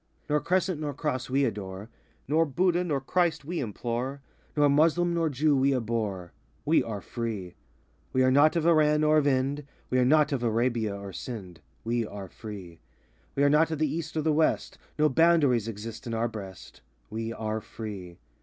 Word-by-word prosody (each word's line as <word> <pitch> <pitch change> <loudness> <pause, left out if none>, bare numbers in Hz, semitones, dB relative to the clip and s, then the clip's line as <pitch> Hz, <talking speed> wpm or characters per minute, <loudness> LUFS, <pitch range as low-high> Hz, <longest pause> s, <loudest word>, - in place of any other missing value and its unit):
Nor 150 0 +2
Crescent 180 0 0
Nor 145 -3 -3
Cross 135 -4 -2
we 135 +2 +2
adore; 100 -3 -5 0.4
Nor 160 +4 +3
Budha 175 +4 +2
nor 150 -6 0
Christ 170 +2 0
we 170 +3 -3
implore; 120 +4 -3 0.3
Nor 145 0 +5
Muslem 165 +4 +3
nor 165 -2 +1
Jew 145 +2 +2
we 135 0 +3
abhor: 110 -7 -2 0.3
We 160 +2 +4
are 105 -3 -5
free. 110 -7 -5 0.6
We 130 - +3
are 130 - +4
not 145 +5 +5
of 165 -2 +1
Iran 155 -2 +4
or 155 0 +4
of 145 - +1
Ind, 140 +2 +1 0.3
We 130 - +3
are - - +4
not 150 +2 +4
of 135 -4 -1
Arabia 115 -2 0
or 100 -1 -8
Sind: 95 -8 -7 0.2
We 115 +1 0
are 100 -2 -7
free. 95 -5 -9 0.6
We 140 - +2
are 145 - +5
not 155 +2 +4
of 160 - -2
the 155 +1 0
East 160 0 -4
or 155 - 0
the 155 0 +2
West; 155 +1 +1 0.2
No 155 0 +4
boundaries 145 -7 +3
exist 110 +1 -7
in 115 - -2
our 115 +1 +1
breast: 100 -5 -9 0.3
We 115 +1 -3
are 110 -1 -3
free. 95 -7 -8
130 Hz, 185 wpm, -28 LUFS, 110-155 Hz, 0.6 s, Nor